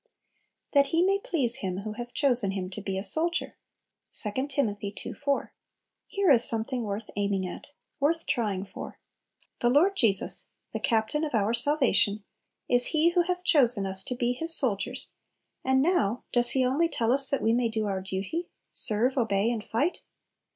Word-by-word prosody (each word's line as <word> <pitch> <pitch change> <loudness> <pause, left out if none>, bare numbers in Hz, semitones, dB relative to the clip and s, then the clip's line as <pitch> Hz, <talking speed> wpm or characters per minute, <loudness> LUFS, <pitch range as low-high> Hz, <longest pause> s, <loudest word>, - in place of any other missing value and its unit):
"That 280 -1 +4
he 330 +5 +1
may 395 +1 +1
please 270 -12 0
him 190 -1 -4
who 215 +1 -6
hath 240 +2 -8
chosen 245 -8 +2
him 185 -1 -5
to 210 - -7
be 195 -1 -4
a 190 - -3
soldier." 330 - +1 0.6
2 250 +6 -3
Tim. 270 -7 -1
ii. 200 0 -6
4. 280 -1 -2 0.5
Here 395 -5 +1
is 240 -3 +6
something 230 +2 +1
worth 205 +1 -5
aiming 200 -2 -1
at, 285 +10 -10 0.3
worth 320 +4 0
trying 205 -7 -2
for! - - -10 0.6
The 240 - +2
Lord 340 +10 +3
Jesus, 215 - +1 0.3
the - - -3
Captain 225 +7 0
of 295 -5 -2
our 215 +1 +1
salvation, 235 -5 +2 0.4
is 245 0 +7
He 315 +1 +3
who 350 0 +2
hath 360 +1 -3
chosen 245 - +3
us 190 0 0
to 250 - -4
be 245 0 0
His 325 +6 +4
soldiers 250 0 -1 0.5
and 265 0 +2
now, 250 - 0
does 240 0 +2
He 260 -1 +2
only 295 +7 +1
tell 230 -5 -1
us 275 +1 +2
that 280 -2 -1
we 225 - +2
may 240 -1 +1
do 220 -1 -2
our 195 -2 -3
duty, 190 - -4 0.2
serve, 240 +5 0
obey, 225 -2 +1
and 225 -3 -4
fight? 285 +13 -2
240 Hz, 180 wpm, -27 LUFS, 205-285 Hz, 0.6 s, is